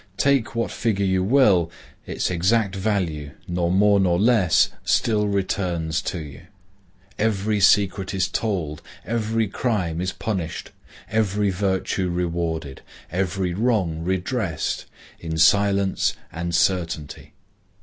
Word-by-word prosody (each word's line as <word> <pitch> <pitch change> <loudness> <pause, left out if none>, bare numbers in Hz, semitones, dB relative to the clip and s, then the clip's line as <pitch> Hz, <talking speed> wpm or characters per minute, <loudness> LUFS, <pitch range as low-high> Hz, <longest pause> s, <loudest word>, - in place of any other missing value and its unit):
Take 135 -5 +2
what 115 - -1
figure 105 -4 0
you 95 -1 +1
will, 100 -7 +4 0.4
its - - -2
exact 95 +3 +1
value, 90 -8 -2
nor 85 -1 0
more 100 +2 +4
nor 90 -2 +2
less, 105 -6 +4
still 105 -2 +2
returns 90 -5 -1
to - - -4
you. 75 -4 -8 0.8
Every 105 -1 +1
secret 100 -1 +3
is 95 -2 0
told, 85 -9 -2 0.2
every 115 -1 0
crime 95 -7 -1
is 95 +1 -1
punished, 95 -7 -4 0.4
every 105 -2 +1
virtue 95 -1 -1
rewarded, 85 -5 -3 0.3
every 90 0 -1
wrong 100 -7 0
redressed, 95 - -2 0.3
in 80 -1 -4
silence 100 +3 +3 0.2
and 85 +1 -3
certainty. 85 -5 -1
95 Hz, 115 wpm, -23 LUFS, 85-105 Hz, 0.8 s, will